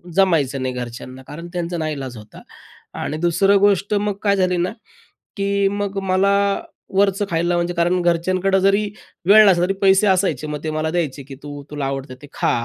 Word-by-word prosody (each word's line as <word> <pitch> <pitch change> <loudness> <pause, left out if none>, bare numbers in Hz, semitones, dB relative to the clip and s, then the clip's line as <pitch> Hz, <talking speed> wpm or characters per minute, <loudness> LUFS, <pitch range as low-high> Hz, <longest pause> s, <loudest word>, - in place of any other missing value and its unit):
जमायचं 150 -9 +2
नाही 130 -1 -2
घरच्यांना. 125 +1 -7
कारण 165 +3 -8
त्यांचा 175 0 -3
नाईलाज 140 -6 -4
होता 105 0 -13 0.6
आणि 155 - -3
दुसरं 195 +4 +3
गोष्ट 200 0 +2
मग 205 0 0
काय 200 -1 +3
झाली 185 -2 +1
ना, 175 +3 0 0.7
की 200 0 +1
मग 200 0 -3
मला 190 +1 +2 0.6
वरचं 200 +1 +2
खायला 170 +1 0
म्हणजे 175 +1 -1
कारण 175 +1 +1
घरच्यांकडं 185 +3 +1
जरी 195 +2 +3 0.4
वेळ 215 +3 +8
नसला 175 -1 +3
तरी, 195 - 0
पैसे 195 +1 +4
असायचे 180 -7 +1
मग 150 -1 -4
ते 155 - -2
मला 155 0 -1
द्यायचे, 150 -5 -2
की 135 0 -10
"तू 145 -1 -8
तुला 145 -2 -3
आवडतं 135 -1 -4
ते 145 - -11
खा - - 0
175 Hz, 180 wpm, -20 LUFS, 150-195 Hz, 0.7 s, वेळ